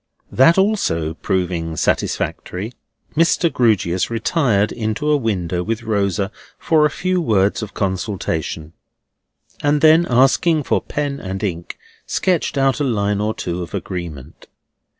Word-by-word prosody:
That 150 Hz, +8 st, +5 dB
also 85 Hz, -, +1 dB
proving 85 Hz, -2 st, -2 dB
satisfactory, 100 Hz, +9 st, -2 dB, 0.4 s
Mr. 165 Hz, +1 st, +2 dB
Grewgious 95 Hz, -7 st, +1 dB
retired 115 Hz, -, +1 dB
into 110 Hz, +6 st, -1 dB
a -, -, +5 dB
window 95 Hz, -, -1 dB
with 115 Hz, +5 st, -3 dB
Rosa 100 Hz, -2 st, 0 dB, 0.3 s
for 155 Hz, -2 st, +3 dB
a -, -, -6 dB
few 185 Hz, +5 st, -1 dB
words 105 Hz, -, +2 dB
of 105 Hz, -2 st, -7 dB
consultation, 90 Hz, -5 st, -3 dB, 0.9 s
and 145 Hz, +1 st, +2 dB
then 160 Hz, +2 st, +6 dB
asking 135 Hz, +6 st, +3 dB
for -, -, +1 dB
pen 145 Hz, -1 st, -3 dB
and 95 Hz, +1 st, -5 dB
ink, 85 Hz, -4 st, -4 dB, 0.3 s
sketched 180 Hz, -5 st, 0 dB
out 135 Hz, +1 st, +2 dB
a -, -, +1 dB
line 105 Hz, -5 st, 0 dB
or 110 Hz, +1 st, -1 dB
two 90 Hz, 0 st, -4 dB
of 85 Hz, -, -6 dB
agreement. 85 Hz, -8 st, -7 dB
110 Hz, 130 wpm, -19 LUFS, 90-145 Hz, 0.9 s, then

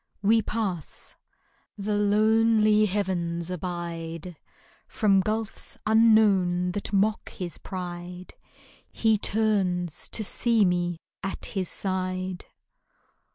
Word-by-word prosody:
We 225 Hz, +3 st, +4 dB
pass. 195 Hz, -8 st, -4 dB, 0.6 s
The 210 Hz, +1 st, -2 dB
lonely 215 Hz, +1 st, +4 dB
heavens 180 Hz, -3 st, -2 dB
abide. 170 Hz, -1 st, -5 dB, 0.5 s
From 200 Hz, -3 st, +3 dB
gulfs 215 Hz, +2 st, -3 dB
unknown 210 Hz, -5 st, +4 dB
that 200 Hz, +2 st, -4 dB
mock 210 Hz, +2 st, +1 dB
his 175 Hz, -2 st, -6 dB
pride 180 Hz, -1 st, -7 dB, 0.6 s
He 220 Hz, -2 st, +2 dB
turns 190 Hz, -7 st, 0 dB
to 220 Hz, -, +2 dB
see 225 Hz, +1 st, +3 dB
me 175 Hz, -1 st, 0 dB, 0.2 s
at 195 Hz, -, -4 dB
his 190 Hz, -4 st, -2 dB
side. 185 Hz, -1 st, -3 dB
195 Hz, 95 wpm, -26 LUFS, 180-215 Hz, 0.6 s, We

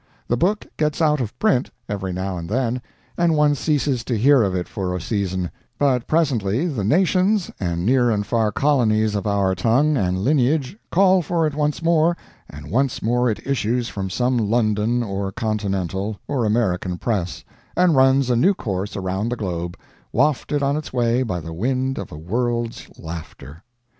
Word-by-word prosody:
The 120 Hz, -, +3 dB
book 195 Hz, -, 0 dB
gets 150 Hz, -1 st, 0 dB
out 150 Hz, -3 st, +3 dB
of 110 Hz, -4 st, -5 dB
print, 190 Hz, -, +2 dB, 0.2 s
every 95 Hz, -2 st, -3 dB
now 95 Hz, +1 st, -3 dB
and 85 Hz, -1 st, -6 dB
then, 125 Hz, +2 st, 0 dB, 0.4 s
and 170 Hz, -2 st, +3 dB
one 150 Hz, -1 st, +4 dB
ceases 145 Hz, -4 st, 0 dB
to 120 Hz, -, -1 dB
hear 135 Hz, +4 st, +5 dB
of 95 Hz, -3 st, +1 dB
it 90 Hz, -1 st, -2 dB
for 90 Hz, -3 st, -3 dB
a -, -, -2 dB
season; 95 Hz, -2 st, -2 dB, 0.3 s
but 130 Hz, -4 st, +1 dB
presently 135 Hz, -, +1 dB
the 135 Hz, -, -2 dB
nations 185 Hz, -, +2 dB
and 85 Hz, -2 st, -2 dB
near 125 Hz, +1 st, +3 dB
and 105 Hz, -2 st, 0 dB
far 110 Hz, -1 st, +1 dB
colonies 110 Hz, -5 st, +2 dB
of 105 Hz, +1 st, -2 dB
our 100 Hz, -2 st, +2 dB
tongue 130 Hz, +11 st, +2 dB
and 90 Hz, -4 st, 0 dB
lineage 135 Hz, -, +1 dB
call 190 Hz, 0 st, +4 dB
for 165 Hz, 0 st, 0 dB
it 155 Hz, -, -1 dB
once 150 Hz, +2 st, -1 dB
more, 165 Hz, +1 st, +3 dB, 0.3 s
and 75 Hz, +2 st, -10 dB
once 130 Hz, +3 st, 0 dB
more 125 Hz, +2 st, +2 dB
it 110 Hz, -, -4 dB
issues 120 Hz, -2 st, 0 dB
from 95 Hz, -1 st, -4 dB
some 125 Hz, +6 st, +1 dB
London 110 Hz, +1 st, +1 dB
or 100 Hz, -2 st, -3 dB
Continental 100 Hz, -2 st, -2 dB
or 130 Hz, -5 st, 0 dB
American 95 Hz, -5 st, 0 dB
press, 95 Hz, -5 st, -2 dB, 0.3 s
and 180 Hz, -3 st, +4 dB
runs 130 Hz, -1 st, +4 dB
a -, -, +3 dB
new 185 Hz, +12 st, +3 dB
course 100 Hz, -, -4 dB
around 95 Hz, +3 st, -2 dB
the 120 Hz, -, -1 dB
globe, 85 Hz, -5 st, -4 dB, 0.3 s
wafted 145 Hz, 0 st, +1 dB
on 140 Hz, +1 st, +1 dB
its 155 Hz, -, -5 dB
way 120 Hz, 0 st, +1 dB
by 95 Hz, -9 st, -2 dB
the 80 Hz, 0 st, -7 dB
wind 130 Hz, +8 st, -1 dB
of 100 Hz, -, -7 dB
a 75 Hz, -, -8 dB
world's 115 Hz, +7 st, -2 dB
laughter. 80 Hz, 0 st, -9 dB
120 Hz, 180 wpm, -22 LUFS, 95-140 Hz, 0.4 s, hear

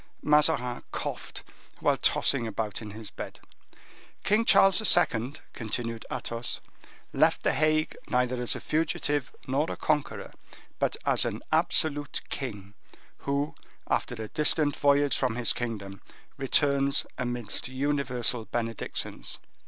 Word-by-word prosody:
Mazarin 150 Hz, -5 st, +3 dB
coughed -, -, -5 dB, 0.4 s
while -, -, +3 dB
tossing 125 Hz, -5 st, +1 dB
about 110 Hz, -2 st, -3 dB
in 110 Hz, -, -7 dB
his 105 Hz, -1 st, -9 dB
bed. -, -, -8 dB, 0.8 s
"King 215 Hz, +3 st, +3 dB
Charles 195 Hz, -2 st, +6 dB, 0.2 s
II.," 125 Hz, -5 st, +1 dB, 0.2 s
continued 115 Hz, 0 st, -4 dB
Athos, 115 Hz, 0 st, -4 dB, 0.5 s
"left -, -, +3 dB
the -, -, +2 dB
Hague 155 Hz, 0 st, +1 dB
neither 125 Hz, -1 st, +1 dB
as 120 Hz, -, 0 dB
a -, -, -4 dB
fugitive 145 Hz, -3 st, -1 dB
nor 140 Hz, +5 st, 0 dB
a -, -, -3 dB
conqueror, 150 Hz, -2 st, -1 dB, 0.5 s
but -, -, 0 dB
as -, -, +4 dB
an -, -, -3 dB
absolute 145 Hz, -2 st, +2 dB
king, 105 Hz, -7 st, -5 dB, 0.5 s
who, 140 Hz, +1 st, 0 dB, 0.3 s
after 125 Hz, -, 0 dB
a 110 Hz, -1 st, -6 dB
distant 150 Hz, -1 st, +3 dB
voyage 145 Hz, 0 st, +3 dB
from 125 Hz, -4 st, 0 dB
his 125 Hz, -1 st, +2 dB
kingdom, 105 Hz, -5 st, -5 dB, 0.3 s
returns 140 Hz, 0 st, +3 dB
amidst 120 Hz, -4 st, 0 dB
universal 130 Hz, -3 st, -1 dB
benedictions." 115 Hz, -1 st, -4 dB
130 Hz, 120 wpm, -28 LUFS, 115-145 Hz, 0.8 s, Charles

